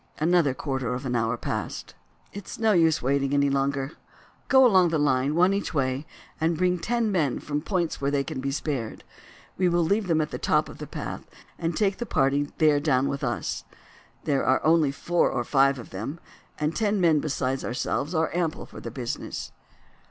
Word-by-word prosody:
Another 160 Hz, -4 st, +2 dB
quarter 130 Hz, -3 st, -2 dB
of 130 Hz, +2 st, -6 dB
an 125 Hz, -1 st, -1 dB
hour 115 Hz, 0 st, 0 dB
passed. -, -, -4 dB, 0.4 s
"It 200 Hz, -1 st, -8 dB
is -, -, -7 dB
no 225 Hz, -1 st, +3 dB
use 165 Hz, -7 st, +3 dB
waiting 140 Hz, +1 st, +1 dB
any 140 Hz, 0 st, +3 dB
longer. 135 Hz, 0 st, 0 dB, 0.6 s
Go 265 Hz, -1 st, +6 dB
along 185 Hz, -7 st, +5 dB
the 160 Hz, -, +1 dB
line, 140 Hz, 0 st, +1 dB
one 180 Hz, +3 st, +4 dB
each 200 Hz, -4 st, -3 dB
way, 135 Hz, +2 st, -1 dB, 0.3 s
and 160 Hz, +1 st, +1 dB
bring 180 Hz, 0 st, +1 dB
ten 230 Hz, +2 st, 0 dB
men 155 Hz, -9 st, +1 dB
from 145 Hz, 0 st, -3 dB
points 170 Hz, -3 st, -2 dB
where 140 Hz, -, +1 dB
they 140 Hz, -1 st, +1 dB
can 145 Hz, -3 st, -5 dB
be 135 Hz, -, -2 dB
spared. 135 Hz, -5 st, -3 dB, 0.6 s
We 180 Hz, -1 st, +3 dB
will 170 Hz, 0 st, +2 dB
leave 200 Hz, +4 st, +1 dB
them 165 Hz, -2 st, +2 dB
at 150 Hz, -, -1 dB
the -, -, -4 dB
top -, -, +1 dB
of -, -, -11 dB
the -, -, -6 dB
path -, -, -6 dB, 0.3 s
and 165 Hz, -1 st, -2 dB
take 200 Hz, -2 st, +1 dB
the 240 Hz, -, -4 dB
party 140 Hz, -1 st, +1 dB
there 155 Hz, -2 st, +4 dB
down 140 Hz, -3 st, +2 dB
with 140 Hz, +1 st, -4 dB
us. 120 Hz, -3 st, -2 dB, 0.6 s
There 140 Hz, -3 st, +1 dB
are 130 Hz, 0 st, +3 dB
only 160 Hz, -3 st, +4 dB
four 175 Hz, +5 st, +1 dB
or 120 Hz, -, -1 dB
five 135 Hz, +1 st, +3 dB
of 120 Hz, -, -10 dB
them, 115 Hz, -, -5 dB, 0.4 s
and 150 Hz, +1 st, -1 dB
ten 210 Hz, -2 st, +1 dB
men 165 Hz, -4 st, +4 dB
besides 135 Hz, -3 st, -2 dB
ourselves 140 Hz, +6 st, -2 dB
are 160 Hz, 0 st, +1 dB
ample 170 Hz, -2 st, -1 dB
for -, -, -11 dB
the 115 Hz, -, -5 dB
business." 120 Hz, 0 st, -5 dB
150 Hz, 200 wpm, -26 LUFS, 135-175 Hz, 0.6 s, Go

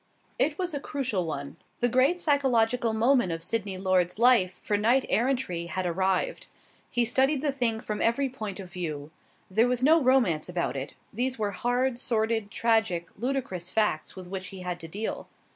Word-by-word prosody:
It 300 Hz, 0 st, +2 dB
was 360 Hz, -3 st, -2 dB
a 285 Hz, -, -2 dB
crucial 260 Hz, -, -2 dB
one. 140 Hz, -2 st, -5 dB, 0.2 s
The 245 Hz, -, +3 dB
great 260 Hz, +8 st, +3 dB
psychological 250 Hz, -6 st, +2 dB
moment 235 Hz, -2 st, +3 dB
of 165 Hz, 0 st, -4 dB
Sydney 200 Hz, -1 st, -2 dB
Lord's 185 Hz, -1 st, +1 dB
life 220 Hz, -7 st, +4 dB
for 205 Hz, -, -1 dB
knight 235 Hz, +6 st, +3 dB
errantry 230 Hz, -9 st, 0 dB
had 185 Hz, +2 st, -3 dB
arrived. 190 Hz, -, 0 dB, 0.4 s
He 240 Hz, -1 st, +2 dB
studied 265 Hz, +4 st, +2 dB
the 290 Hz, -, +2 dB
thing 240 Hz, -5 st, 0 dB
from 210 Hz, -1 st, -4 dB
every 255 Hz, +4 st, +2 dB
point 215 Hz, -7 st, -6 dB
of 185 Hz, -2 st, -9 dB
view. 155 Hz, -4 st, -5 dB, 0.4 s
There 220 Hz, +5 st, +4 dB
was 250 Hz, 0 st, 0 dB
no 320 Hz, +4 st, +6 dB
romance 240 Hz, -, +2 dB
about 175 Hz, -4 st, -2 dB
it. 135 Hz, +1 st, -5 dB, 0.2 s
These 255 Hz, +4 st, 0 dB
were 210 Hz, -2 st, -1 dB
hard, 245 Hz, +4 st, 0 dB
sordid, 220 Hz, -3 st, 0 dB
tragic, 220 Hz, -7 st, +1 dB
ludicrous 230 Hz, -8 st, -3 dB
facts 210 Hz, -8 st, 0 dB
with 185 Hz, -2 st, -9 dB
which 190 Hz, 0 st, -5 dB
he 190 Hz, -1 st, -8 dB
had 180 Hz, -1 st, -4 dB
to 165 Hz, -, -7 dB
deal. 205 Hz, +7 st, -4 dB
220 Hz, 175 wpm, -27 LUFS, 185-255 Hz, 0.4 s, no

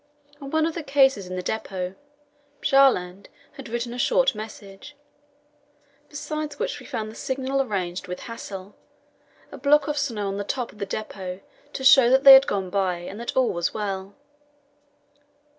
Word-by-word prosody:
On 275 Hz, -, -7 dB
one 315 Hz, +1 st, +1 dB
of 330 Hz, -, -2 dB
the 335 Hz, -, -4 dB
cases 270 Hz, -9 st, +2 dB
in 185 Hz, -, -6 dB
the 180 Hz, -, -4 dB
depot 185 Hz, -4 st, -4 dB, 0.7 s
Bjaaland 200 Hz, -10 st, +2 dB, 0.2 s
had -, -, -11 dB
written 235 Hz, +1 st, -3 dB
a 245 Hz, -, -7 dB
short -, -, +3 dB
message, 215 Hz, +4 st, -10 dB, 1.1 s
besides 305 Hz, 0 st, -5 dB
which -, -, -3 dB
we -, -, -13 dB
found 220 Hz, -5 st, -4 dB
the -, -, -14 dB
signal 265 Hz, +2 st, -2 dB
arranged 190 Hz, -6 st, -3 dB
with 180 Hz, 0 st, -6 dB
Hassel 200 Hz, -4 st, -8 dB, 0.8 s
a 280 Hz, -, -9 dB
block 295 Hz, +3 st, +3 dB
of 295 Hz, -1 st, -1 dB
snow 225 Hz, -8 st, -2 dB
on 195 Hz, 0 st, -3 dB
the 205 Hz, -, -2 dB
top 245 Hz, +3 st, -3 dB
of 210 Hz, -, -19 dB
the 200 Hz, -, -3 dB
depot 190 Hz, -3 st, -6 dB, 0.3 s
to 265 Hz, -, -5 dB
show 265 Hz, -2 st, +7 dB
that 265 Hz, +2 st, +4 dB
they 275 Hz, -2 st, +11 dB
had 265 Hz, +1 st, +8 dB
gone 190 Hz, -2 st, -2 dB
by, 190 Hz, -2 st, 0 dB
and 175 Hz, +4 st, -8 dB
that 235 Hz, +2 st, -5 dB
all 260 Hz, -2 st, +3 dB
was 170 Hz, -1 st, -2 dB
well. 195 Hz, -2 st, -4 dB
230 Hz, 175 wpm, -24 LUFS, 195-275 Hz, 1.1 s, they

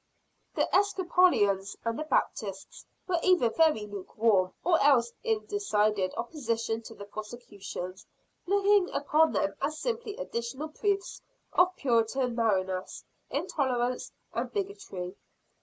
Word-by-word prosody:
The -, -, +2 dB
Episcopalians 345 Hz, -, +3 dB
and 230 Hz, +3 st, -1 dB
the 310 Hz, -, -3 dB
Baptists 200 Hz, -8 st, -2 dB, 0.2 s
were 355 Hz, -2 st, +1 dB
either 355 Hz, -12 st, +4 dB
very 310 Hz, -9 st, +3 dB
lukewarm, 205 Hz, -1 st, +1 dB
or 345 Hz, -1 st, +3 dB
else 245 Hz, -5 st, +4 dB
in 445 Hz, -2 st, 0 dB
decided 210 Hz, -, +1 dB
opposition 230 Hz, -4 st, -2 dB
to 225 Hz, 0 st, -11 dB
the 200 Hz, -, -9 dB
prosecutions 205 Hz, -4 st, -7 dB, 0.4 s
looking 400 Hz, 0 st, +4 dB
upon 310 Hz, +2 st, +3 dB
them 295 Hz, -, +1 dB
as 305 Hz, +1 st, -1 dB
simply 460 Hz, 0 st, -3 dB
additional 265 Hz, -, -4 dB
proofs 395 Hz, +4 st, -2 dB, 0.3 s
of 360 Hz, 0 st, +4 dB
Puritan 245 Hz, 0 st, +1 dB
narrowness, 190 Hz, -5 st, -1 dB, 0.3 s
intolerance 250 Hz, -3 st, -1 dB, 0.2 s
and -, -, -2 dB
bigotry. 385 Hz, -, -4 dB
245 Hz, 115 wpm, -29 LUFS, -, 0.4 s, either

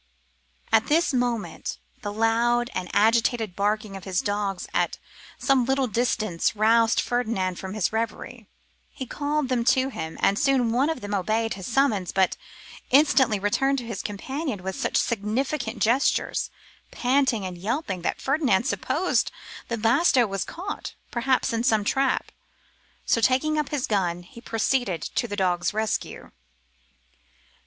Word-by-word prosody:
At 220 Hz, 0 st, +4 dB
this 320 Hz, 0 st, +2 dB
moment 245 Hz, -3 st, -2 dB, 0.2 s
the 205 Hz, -, -4 dB
loud 235 Hz, +3 st, +1 dB
and 180 Hz, -1 st, -4 dB
agitated 225 Hz, -1 st, +2 dB
barking 210 Hz, 0 st, -1 dB
of 190 Hz, -, -8 dB
his 185 Hz, -2 st, -1 dB
dogs 205 Hz, -2 st, -2 dB
at -, -, 0 dB, 0.4 s
some 270 Hz, -3 st, +2 dB
little 265 Hz, +2 st, +1 dB
distance 220 Hz, -5 st, 0 dB
roused 225 Hz, +2 st, +4 dB
Ferdinand 220 Hz, -7 st, -1 dB
from 190 Hz, +1 st, -6 dB
his 215 Hz, -1 st, 0 dB
reverie. 225 Hz, +1 st, -4 dB, 0.4 s
He 260 Hz, -, -7 dB
called 290 Hz, +2 st, -1 dB
them 250 Hz, -2 st, 0 dB
to 260 Hz, +1 st, +3 dB
him, 160 Hz, -10 st, -6 dB
and 200 Hz, -, +2 dB
soon 265 Hz, -5 st, +2 dB
one 260 Hz, +6 st, +2 dB
of 320 Hz, -6 st, -3 dB
them 205 Hz, 0 st, -5 dB
obeyed 220 Hz, +4 st, 0 dB
his 190 Hz, -2 st, -7 dB
summons, 230 Hz, -8 st, +1 dB
but 190 Hz, -1 st, +2 dB, 0.5 s
instantly 265 Hz, -5 st, +4 dB
returned 270 Hz, +8 st, +1 dB
to 245 Hz, -, -4 dB
his 225 Hz, -4 st, -4 dB
companion 245 Hz, -, -4 dB
with 190 Hz, 0 st, -3 dB
such -, -, -1 dB
significant 235 Hz, +3 st, -1 dB
gestures, 245 Hz, +5 st, +1 dB, 0.4 s
panting 250 Hz, -5 st, +1 dB
and 185 Hz, -1 st, -5 dB
yelping, 200 Hz, -, -3 dB
that -, -, -2 dB
Ferdinand 270 Hz, -8 st, +2 dB
supposed 270 Hz, -, 0 dB, 0.4 s
that 230 Hz, -2 st, -4 dB
Basto 245 Hz, 0 st, +4 dB
was 195 Hz, -1 st, -2 dB
caught, 385 Hz, +4 st, -6 dB, 0.2 s
perhaps, 255 Hz, +1 st, +1 dB
in 230 Hz, 0 st, 0 dB
some 220 Hz, -4 st, +3 dB
trap: 270 Hz, +5 st, 0 dB, 0.7 s
so, 230 Hz, -, +2 dB
taking 285 Hz, +6 st, +2 dB
up 300 Hz, -, -2 dB
his 285 Hz, -4 st, -1 dB
gun, 175 Hz, -4 st, -1 dB
he 230 Hz, +6 st, -14 dB
proceeded 225 Hz, -, 0 dB
to 240 Hz, -, -2 dB
the 205 Hz, -, -4 dB
dog's 180 Hz, 0 st, 0 dB
rescue. 220 Hz, 0 st, -3 dB
230 Hz, 150 wpm, -25 LUFS, 205-260 Hz, 0.7 s, At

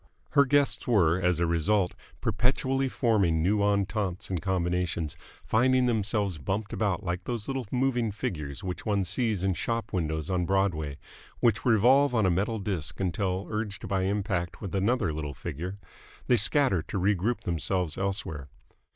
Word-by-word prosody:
Her 140 Hz, -, +5 dB
guests 145 Hz, +1 st, +2 dB
were 90 Hz, -7 st, +3 dB
as 90 Hz, -2 st, +2 dB
a 85 Hz, -, +2 dB
result 90 Hz, +4 st, +1 dB, 0.3 s
perpetually 135 Hz, +1 st, +1 dB
forming 100 Hz, -, +2 dB
new 105 Hz, +4 st, +2 dB
ententes 100 Hz, -2 st, 0 dB
and 90 Hz, -4 st, -1 dB
combinations, 90 Hz, -4 st, -1 dB, 0.3 s
finding 130 Hz, +3 st, +3 dB
themselves 105 Hz, -6 st, 0 dB
bumped 100 Hz, +8 st, -3 dB
about 105 Hz, -2 st, 0 dB
like 90 Hz, 0 st, -3 dB
those 115 Hz, -4 st, -3 dB
little 135 Hz, -4 st, -3 dB
moving 125 Hz, -3 st, +1 dB
figures 75 Hz, -, -4 dB
which 90 Hz, -1 st, -4 dB
one 100 Hz, -3 st, 0 dB
sees 100 Hz, +1 st, 0 dB
in 95 Hz, -1 st, +2 dB
shop 110 Hz, +5 st, -2 dB
windows 80 Hz, -3 st, -1 dB
on 90 Hz, -2 st, 0 dB
Broadway, 85 Hz, -7 st, 0 dB, 0.4 s
which 115 Hz, -3 st, +2 dB
revolve 125 Hz, +4 st, +5 dB
on 110 Hz, -3 st, +3 dB
a 95 Hz, -, +3 dB
metal 100 Hz, +6 st, 0 dB
disc 95 Hz, -7 st, -3 dB
until, 95 Hz, 0 st, -1 dB
urged 105 Hz, -2 st, -3 dB
by 95 Hz, 0 st, 0 dB
impact 95 Hz, -3 st, -1 dB
with 100 Hz, -4 st, -6 dB
another 100 Hz, -2 st, +1 dB
little 75 Hz, -2 st, -4 dB
figure, 90 Hz, +10 st, -5 dB, 0.5 s
they 125 Hz, -, +4 dB
scatter 110 Hz, -, +3 dB
to 90 Hz, -, -5 dB
regroup 100 Hz, +5 st, +1 dB
themselves 85 Hz, -1 st, -1 dB
elsewhere. 95 Hz, -7 st, -3 dB
100 Hz, 155 wpm, -28 LUFS, 90-110 Hz, 0.5 s, Her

